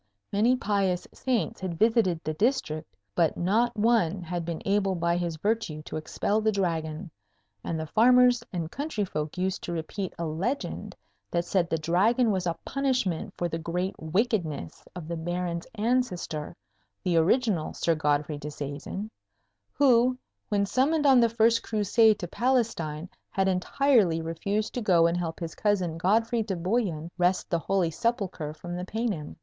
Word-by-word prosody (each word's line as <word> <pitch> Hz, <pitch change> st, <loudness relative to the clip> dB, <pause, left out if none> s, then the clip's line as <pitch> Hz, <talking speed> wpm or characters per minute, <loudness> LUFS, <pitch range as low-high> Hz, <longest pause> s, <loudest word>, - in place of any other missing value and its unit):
Many 225 Hz, +5 st, +4 dB
pious 195 Hz, -6 st, 0 dB
saints 235 Hz, -, -1 dB
had 180 Hz, -3 st, -3 dB
visited 215 Hz, -6 st, +2 dB
the 155 Hz, -, -2 dB
district, 160 Hz, -, -1 dB, 0.2 s
but 165 Hz, +5 st, +2 dB
not 220 Hz, +7 st, +1 dB
one 205 Hz, -5 st, +2 dB
had 175 Hz, 0 st, -4 dB
been 170 Hz, -1 st, -3 dB
able 195 Hz, -1 st, +1 dB
by 170 Hz, 0 st, +1 dB
his 175 Hz, -2 st, -2 dB
virtue 205 Hz, -5 st, -1 dB
to -, -, -7 dB
expel 200 Hz, +7 st, -1 dB
the 220 Hz, 0 st, +2 dB
Dragon; 165 Hz, -4 st, -2 dB, 0.5 s
and 165 Hz, -, -3 dB
the 160 Hz, -, -3 dB
farmers 245 Hz, +6 st, +5 dB
and 170 Hz, -3 st, -4 dB
country 280 Hz, -8 st, -2 dB
folk 155 Hz, -2 st, -4 dB
used 185 Hz, +1 st, -1 dB
to -, -, -5 dB
repeat 170 Hz, +3 st, -4 dB
a 170 Hz, -, -3 dB
legend 190 Hz, -, -3 dB, 0.3 s
that 170 Hz, 0 st, 0 dB
said 175 Hz, -2 st, +1 dB
the 165 Hz, -, +1 dB
Dragon 205 Hz, +9 st, +2 dB
was 185 Hz, -2 st, -1 dB
a 165 Hz, -1 st, -1 dB
punishment 250 Hz, -9 st, -1 dB
for 175 Hz, -, 0 dB
the 165 Hz, -1 st, -4 dB
great 180 Hz, +3 st, -2 dB
wickedness 160 Hz, -, -1 dB
of 175 Hz, -3 st, -7 dB
the 170 Hz, -, -3 dB
Baron's 175 Hz, +1 st, -3 dB
ancestor, 210 Hz, -9 st, -1 dB, 0.5 s
the 175 Hz, -, +1 dB
original 185 Hz, 0 st, +2 dB
Sir 165 Hz, -, +1 dB
Godfrey 150 Hz, -1 st, 0 dB
Disseisin, 150 Hz, +8 st, -6 dB, 0.6 s
who, 255 Hz, -2 st, +4 dB, 0.3 s
when 200 Hz, -1 st, +2 dB
summoned 290 Hz, +8 st, +1 dB
on 265 Hz, -3 st, +7 dB
the 235 Hz, -1 st, +4 dB
first 230 Hz, +1 st, +3 dB
Crusade 220 Hz, 0 st, +3 dB
to 180 Hz, -5 st, -5 dB
Palestine, 215 Hz, -10 st, 0 dB, 0.2 s
had 195 Hz, 0 st, 0 dB
entirely 190 Hz, -1 st, +3 dB
refused 200 Hz, +7 st, -2 dB
to 245 Hz, -, -2 dB
go 175 Hz, -6 st, +4 dB
and 170 Hz, +1 st, +2 dB
help 165 Hz, -2 st, -3 dB
his 165 Hz, -2 st, -5 dB
cousin 185 Hz, -6 st, 0 dB
Godfrey 225 Hz, +6 st, +2 dB
de 210 Hz, -3 st, -2 dB
Bouillon 175 Hz, -3 st, -1 dB
wrest 180 Hz, +1 st, +1 dB
the 170 Hz, -, +2 dB
Holy 180 Hz, -1 st, 0 dB
Sepulchre 195 Hz, -7 st, -2 dB
from 175 Hz, +3 st, -7 dB
the 180 Hz, -, -4 dB
Paynim. 210 Hz, -8 st, -3 dB
185 Hz, 160 wpm, -27 LUFS, 165-225 Hz, 0.6 s, on